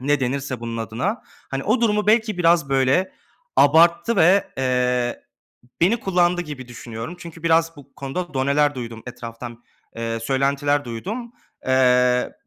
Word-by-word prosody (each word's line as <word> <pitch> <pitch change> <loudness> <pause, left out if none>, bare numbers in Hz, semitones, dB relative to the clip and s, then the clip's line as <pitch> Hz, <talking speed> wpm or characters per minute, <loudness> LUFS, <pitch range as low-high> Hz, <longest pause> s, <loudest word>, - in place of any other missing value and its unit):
ne 145 +2 +1
denirse 130 -1 -2
bunun 115 0 -5
adına, 115 - -3 0.3
hani, 135 0 -3
o 255 - +1
durumu 210 -2 +1
belki 220 -2 +2
biraz, 165 -4 +3
böyle, 135 +8 +2 0.4
abarttı 170 +9 +4
ve, 185 +5 +4
eee, 125 -1 0 0.6
beni 215 +7 +3
kullandı 175 -2 +1
gibi 145 -6 -8
düşünüyorum. 120 +5 -8
Çünkü 165 -1 -11
biraz 165 0 +2
bu 140 -1 -16
konuda 150 +3 -5
doneler 140 +2 +2
duydum 115 -3 -7
etraftan, 120 0 -9 0.3
eee, 115 0 -3
söylentiler 140 +3 0
duydum. 215 - -6 0.3
Eee, 125 -1 +3
140 Hz, 135 wpm, -22 LUFS, 125-175 Hz, 0.6 s, abarttı